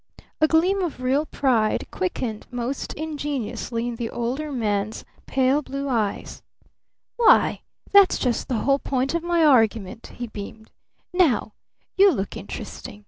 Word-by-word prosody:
A 310 - +6
gleam 360 +5 +2
of 340 -8 -3
real 275 +4 +1
pride 230 -6 +1
quickened 215 +4 -3
most 245 +2 -4
ingenuously 265 -6 -3
in 240 -1 -4
the 230 -1 -3
Older 260 +6 -3
Man's 215 -4 -2 0.2
pale 270 +2 +2
blue 275 0 -5
eyes. 220 -5 -2 0.8
"Why, 475 - +4 0.3
that's 400 -2 +6
just 245 -2 -1
the 250 - -1
whole 275 0 +3
point 265 +1 -1
of 340 - 0
my 340 -1 +2
argument," 225 -6 +2
he 245 - -4
beamed. 220 0 -9 0.4
"Now 285 - +2 0.4
you 395 0 +7
look 195 - -3
interesting. 205 - -8
255 Hz, 140 wpm, -23 LUFS, 225-305 Hz, 0.8 s, you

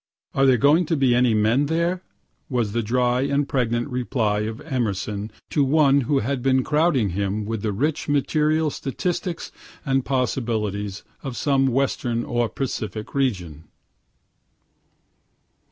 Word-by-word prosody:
("Are 135 0 +3
there 130 -2 +5
going 150 +7 +4
to 165 - +1
be 130 -3 +3
any 120 -2 +3
men 115 +7 +2
there?" 170 +3 0 0.5
was 120 -6 0
the 115 +2 0
dry 125 +2 +1
and 140 +1 +1
pregnant 120 -2 0
reply 120 -4 0
of 110 +2 -3
Emerson 105 -7 -2 0.2
to 145 - +3
one 140 0 +4
who 140 +3 +1
had 135 +2 -1
been 130 0 +2
crowding 150 - +2
him 100 +3 -2
with 110 -1 -3
the 110 - -1
rich 145 +10 -1
material 155 +2 +2
statistics 175 +6 -3 0.3
and 135 -2 +1
possibilities 110 -7 -2 0.2
of 135 -3 -6
some 135 -2 +2
western 125 -2 0
or 120 -2 0
Pacific 110 -5 -4
region.) 90 - -2
125 Hz, 135 wpm, -23 LUFS, 110-140 Hz, 0.5 s, there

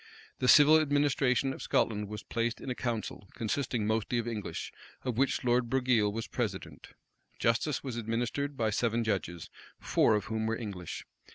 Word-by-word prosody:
The 125 - 0
civil 155 +3 +8
administration 140 -3 +2
of - - -9
Scotland 105 -1 0
was 105 +1 -7
placed 115 0 -2
in 130 - -5
a - - +1
council, 115 -5 -4
consisting 120 0 -1
mostly 110 +2 0
of 120 0 -1
English, 110 -4 -4 0.3
of 125 -3 -2
which 135 +3 +1
Lord 120 -1 +2
Broghile 125 -5 +2
was 115 +2 -4
president. 95 - -5 0.4
Justice 115 +5 +1
was 130 -4 -4
administered 120 +5 -2
by 110 -2 +1
seven 115 +2 +1
judges, 90 -6 -3 0.3
four 110 - +3
of 105 -2 -1
whom 110 +1 -2
were 115 0 0
English. 100 -7 -6
115 Hz, 165 wpm, -30 LUFS, 110-130 Hz, 0.4 s, civil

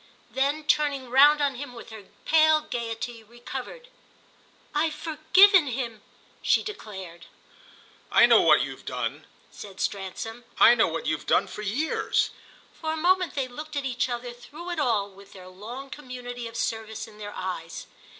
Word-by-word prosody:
Then 280 +3 0
turning 285 -4 +1
round 290 +3 +6
on 280 -1 +1
him 255 0 -7
with 230 - -11
her 215 -3 -10 0.2
pale 315 -1 +5
gaiety 235 -3 -5
recovered, 250 - -8 0.9
"I've 310 +1 +1
forgiven 330 +3 +5
him!" 235 -4 -4 0.4
she - - +3
declared. 190 - -8 0.8
"I - - +7
know - - +6
what - - +5
you've - - -7
done," - - -4 0.2
said 195 -2 -11
Stransom 205 +4 -4 0.2
"I - - +9
know 235 - +3
what 165 -1 -4
you've 155 -1 -2
done - - +3
for - - -8
years." 230 +11 0 0.4
For 315 -1 -4
a - - -4
moment 365 +2 +2
they 270 -2 -1
looked 300 +5 -9
at 285 -1 -2
each 255 -1 -1
other 240 0 -4
through 300 +9 -9
it 345 - -3
all 225 -8 +1
with 195 0 -16
their 185 -1 -12
long 235 +9 -9
community 250 -4 -7
of 230 0 -8
service 220 0 -3
in 210 -1 -16
their 205 -1 -7
eyes. 175 -3 -5
245 Hz, 160 wpm, -26 LUFS, 220-300 Hz, 0.9 s, I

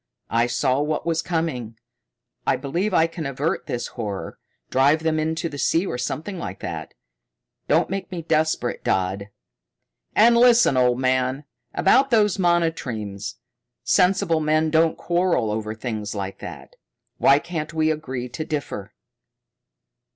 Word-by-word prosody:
I 115 +1 +3
saw 130 +2 +1
what 150 +1 -2
was 165 -1 +1
coming. 145 -11 -3 0.7
I - - +4
believe 175 +9 -2
I 165 -3 +4
can 165 -2 -5
avert 140 +4 -2
this 120 - -3
horror, 105 -5 -6 0.3
drive 145 +5 +3
them 160 -1 +1
into 160 +2 -1
the 145 -3 -7
sea 165 +7 +2
or 125 - -3
something 165 +9 -4
like - - -5
that. - - -6 0.7
Don't - - +3
make 195 0 -4
me 175 -3 -5
desperate, 155 -6 0
Dodd. 95 +2 -1 0.9
"And 235 +2 +6
listen, 235 - +5
old 125 -1 +3
man. 130 +2 +1 0.3
About 265 +8 +4
those 210 -4 +3
monotremes 135 - -1 0.5
sensible 180 -3 +3
men 155 +1 +1
don't 160 0 +3
quarrel 175 -10 +1
over 110 0 -3
things 110 -3 -4
like 95 -1 -5
that. - - -10 0.4
Why 140 - +6
can't 155 0 -4
we 160 -1 +1
agree 135 -5 -4
to 140 +6 -5
differ?" 145 -10 -5
155 Hz, 140 wpm, -23 LUFS, 125-170 Hz, 0.9 s, And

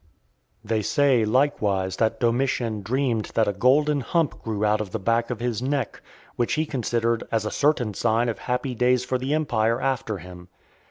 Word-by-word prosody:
They 110 -1 0
say 135 -1 +2
likewise 105 -7 +1
that 110 0 0
Domitian 120 -2 0
dreamed 120 +1 0
that 110 -2 +3
a 100 - +1
golden 145 +8 +3
hump 160 +4 -1
grew 110 -2 -2
out 105 0 +2
of 105 - -5
the 100 - -3
back 115 +3 +1
of 125 - -4
his 120 -2 -2
neck, 140 +2 -2 0.3
which 120 - 0
he 155 +1 +1
considered 115 -4 -1
as 110 -2 0
a 105 - -2
certain 140 -7 +1
sign 115 +4 +1
of 115 - -3
happy 125 +1 -2
days 125 +1 +2
for 130 0 -1
the 135 +4 -1
empire 115 -7 +1
after 130 -5 -1
him. 90 0 -11
120 Hz, 180 wpm, -24 LUFS, 110-130 Hz, 0.3 s, that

